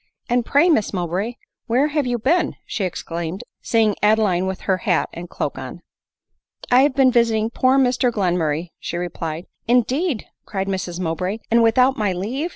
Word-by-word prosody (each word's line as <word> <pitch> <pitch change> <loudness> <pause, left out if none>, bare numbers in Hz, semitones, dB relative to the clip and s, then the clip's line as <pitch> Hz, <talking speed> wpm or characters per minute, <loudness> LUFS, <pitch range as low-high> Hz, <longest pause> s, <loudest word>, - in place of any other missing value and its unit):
" - - -44
And 245 0 +3
pray, 285 +8 +3
Miss 225 - +2
Mowbray, 185 +6 -2 0.3
where 260 +6 +2
have 295 -3 0
you 245 -1 0
been 325 +10 +1
?" - - -48
she 200 - -2
exclaimed, 170 0 -4 0.2
seeing 225 -2 +2
Adeline 210 -4 +3
with 190 0 -4
her 190 -2 +1
hat 185 -5 0
and 175 +1 -8
cloak 140 - -4
on. 130 +6 -8 0.5
" - - -19
I 250 +1 +7
have 280 -1 +2
been 265 -2 +5
visiting 230 -2 +2
poor 255 +2 +3
Mr 250 -1 +2
Glenmurray," 175 -5 -1
she 170 - -4
re 175 0 -2
plied. 165 +1 -5 0.2
"Indeed 250 - +1
!" - - -56
cried 195 -2 -3
Mrs 185 -2 -3
Mowbray; 180 +4 -2
" - - -43
and 235 +1 +5
without 250 +4 +4
my 205 -3 +1
leave 245 - -3
215 Hz, 195 wpm, -21 LUFS, 180-250 Hz, 0.5 s, I